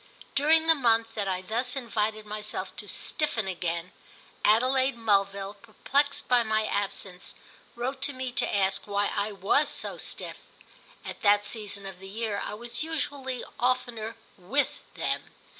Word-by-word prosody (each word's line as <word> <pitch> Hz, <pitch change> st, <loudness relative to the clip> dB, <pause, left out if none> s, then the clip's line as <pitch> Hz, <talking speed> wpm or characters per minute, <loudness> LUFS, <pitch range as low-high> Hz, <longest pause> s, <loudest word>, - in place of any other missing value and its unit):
During 315 Hz, +3 st, +5 dB
the 325 Hz, -, +7 dB
month 230 Hz, -5 st, +2 dB
that 205 Hz, -3 st, -2 dB
I 185 Hz, -1 st, -1 dB
thus 240 Hz, +6 st, 0 dB
invited 215 Hz, -4 st, -1 dB
myself 210 Hz, 0 st, -4 dB
to -, -, -3 dB
stiffen 230 Hz, -9 st, 0 dB
again, 175 Hz, -1 st, -2 dB, 0.5 s
Adelaide 255 Hz, +3 st, +4 dB
Mulville, 200 Hz, -2 st, +1 dB
perplexed 280 Hz, +5 st, 0 dB
by 245 Hz, -1 st, +5 dB
my 220 Hz, -1 st, +1 dB
absence, 195 Hz, -3 st, -3 dB, 0.4 s
wrote 260 Hz, +3 st, -3 dB
to 285 Hz, -, +2 dB
me 255 Hz, -1 st, -3 dB
to -, -, +1 dB
ask 195 Hz, 0 st, +2 dB
why 205 Hz, 0 st, +1 dB
I 205 Hz, +1 st, 0 dB
was 200 Hz, +9 st, +2 dB
so -, -, -3 dB
stiff. -, -, -3 dB, 0.7 s
At -, -, -7 dB
that 205 Hz, -2 st, +5 dB
season 205 Hz, -2 st, -3 dB
of 190 Hz, -2 st, -8 dB
the 195 Hz, 0 st, -9 dB
year 215 Hz, 0 st, -2 dB
I 210 Hz, -, -4 dB
was 235 Hz, +2 st, -5 dB
usually 285 Hz, -5 st, -3 dB, 0.2 s
oftener 245 Hz, -3 st, 0 dB, 0.2 s
"with" 260 Hz, +11 st, 0 dB, 0.2 s
them. -, -, -3 dB
220 Hz, 150 wpm, -28 LUFS, 200-255 Hz, 0.7 s, the